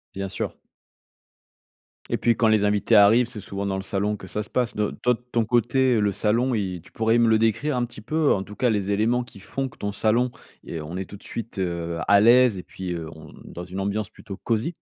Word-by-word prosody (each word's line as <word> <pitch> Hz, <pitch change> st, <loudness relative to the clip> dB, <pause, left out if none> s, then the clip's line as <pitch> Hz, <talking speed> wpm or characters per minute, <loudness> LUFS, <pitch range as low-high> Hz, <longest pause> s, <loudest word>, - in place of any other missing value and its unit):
Bien 95 Hz, 0 st, -3 dB
sûr. 95 Hz, -, -4 dB, 1.5 s
Et -, -, 0 dB
puis 120 Hz, -1 st, +2 dB
quand 115 Hz, -, +2 dB
les 110 Hz, -2 st, +3 dB
invités 105 Hz, +2 st, +2 dB
arrivent, 105 Hz, +4 st, +6 dB
c'est 120 Hz, -4 st, -7 dB
souvent 100 Hz, +1 st, -5 dB
dans 95 Hz, -1 st, -1 dB
le -, -, -3 dB
salon 100 Hz, +2 st, -1 dB
que 95 Hz, -2 st, -11 dB
ça 105 Hz, +4 st, -3 dB
se -, -, -14 dB
passe. 125 Hz, -2 st, -1 dB
De 105 Hz, -1 st, 0 dB
toi 125 Hz, -, +3 dB
de 125 Hz, -, -18 dB
ton 115 Hz, -1 st, +2 dB
côté 120 Hz, +1 st, +2 dB
le 105 Hz, -1 st, +2 dB
salon 115 Hz, +6 st, +1 dB
y 95 Hz, -5 st, -2 dB
tu -, -, -19 dB
pourrais 115 Hz, +1 st, +2 dB
me 115 Hz, -1 st, +4 dB
le 110 Hz, -1 st, +4 dB
décrire 115 Hz, +6 st, +1 dB
un 125 Hz, -, +1 dB
petit 115 Hz, -2 st, -11 dB
peu? 155 Hz, +6 st, +1 dB
En 95 Hz, -, +1 dB
tout 105 Hz, +1 st, -11 dB
cas 125 Hz, -, +1 dB
les 100 Hz, -2 st, 0 dB
éléments 115 Hz, +4 st, +1 dB
qui 110 Hz, -4 st, -14 dB
font 135 Hz, +7 st, -3 dB
que -, -, -19 dB
ton 100 Hz, -, -3 dB
salon 115 Hz, +4 st, +2 dB, 0.3 s
et 80 Hz, -, -6 dB
on 80 Hz, +4 st, -6 dB
est 95 Hz, -, -3 dB
tout 100 Hz, -, -11 dB
de -, -, -18 dB
suite, 115 Hz, -2 st, -6 dB
heu, 85 Hz, -2 st, -2 dB
à 100 Hz, 0 st, +6 dB
l'aise 120 Hz, 0 st, +5 dB
et -, -, -8 dB
puis, 90 Hz, -2 st, -6 dB
heu, 80 Hz, -2 st, -5 dB
on 80 Hz, -1 st, -13 dB
dans 90 Hz, 0 st, -8 dB
une 95 Hz, +1 st, -6 dB
ambiance 100 Hz, +1 st, -2 dB
plutôt 100 Hz, -2 st, -10 dB
cosy? 115 Hz, +9 st, -1 dB
105 Hz, 245 wpm, -24 LUFS, 95-120 Hz, 1.5 s, arrivent